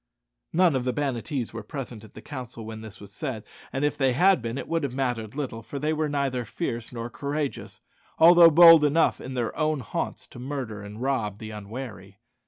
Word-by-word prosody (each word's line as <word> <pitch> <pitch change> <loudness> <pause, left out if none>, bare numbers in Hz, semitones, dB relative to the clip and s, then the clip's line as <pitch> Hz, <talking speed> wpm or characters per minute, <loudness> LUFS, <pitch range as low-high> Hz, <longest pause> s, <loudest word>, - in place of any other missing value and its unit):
None 175 -3 +3
of 130 - 0
the 125 0 -1
Banattees 135 -3 -2
were 115 - -5
present 120 -1 -7
at 110 - -16
the - - -11
council 125 -5 -8
when 110 0 -7
this 110 -2 -11
was 100 0 -13
said; 130 -9 -4 0.3
and 135 +2 -1
if 150 - -1
they 135 -2 +3
had 185 +4 +4
been 115 +2 -4
it - - -5
would 165 0 0
have 135 -4 -3
mattered 120 -4 -2
little, 130 -6 -4
for 140 - -7
they 150 +3 0
were 155 -1 -1
neither 135 -3 -1
fierce 115 -4 -4
nor 115 -1 -5
courageous, 140 +3 -4 0.4
although 170 +1 +8
bold 165 -1 +9
enough 150 +3 +2
in 130 - -7
their 120 -2 -2
own 155 -2 0
haunts 110 - -4
to - - -12
murder 125 -5 -5
and 105 +4 -8
rob 115 -7 -1
the 110 0 -8
unwary. 105 -2 -8
130 Hz, 205 wpm, -26 LUFS, 115-145 Hz, 0.4 s, bold